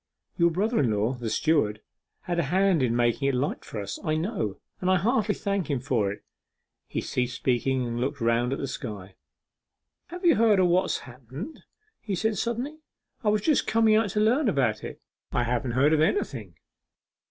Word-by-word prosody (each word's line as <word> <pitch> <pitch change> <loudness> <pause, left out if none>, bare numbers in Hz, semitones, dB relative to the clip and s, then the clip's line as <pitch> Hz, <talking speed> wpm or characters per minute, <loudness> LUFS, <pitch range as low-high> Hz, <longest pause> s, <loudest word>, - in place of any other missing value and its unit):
Your 170 -1 +4
brother 210 +8 0
in 130 - +2
law, 105 +3 +1
the 120 -3 -4
steward, 110 -7 +1 0.4
had 175 -2 -2
a - - +2
hand 185 +1 +2
in 120 -2 +1
making 120 +3 +1
it 135 - 0
light 135 +4 -2
for 110 - -6
us, 100 - -5
I 155 -1 0
know, 160 - -2 0.2
and 185 - -1
I 185 - +5
heartily 215 +1 +1
thank 200 -4 -2
him 140 -3 0
for 120 -7 0
it.' 100 - -9 0.6
He - - -3
ceased 125 0 -2
speaking, 130 0 0
and 120 0 -3
looked 140 +3 -2
round 115 +1 +1
at 135 - -1
the - - -3
sky. 105 -7 -7 0.9
'Have 355 +1 -7
you 335 - +5
heard 220 -3 +4
o' 185 - +5
what's 180 +2 +1
happened?' 130 - -9 0.4
he 205 -3 -3
said 220 +3 0
suddenly; 245 +7 -3 0.4
'I 210 - +3
was 210 0 +2
just 305 +2 +2
coming 225 -1 +4
out 220 -1 +2
to 210 - -1
learn 235 +5 +3
about 120 - 0
it.' - - -7 0.3
'I 125 - +2
haven't 120 +1 -1
heard 140 +5 +4
of 155 - +3
anything. 110 - -1
145 Hz, 195 wpm, -26 LUFS, -, 0.9 s, I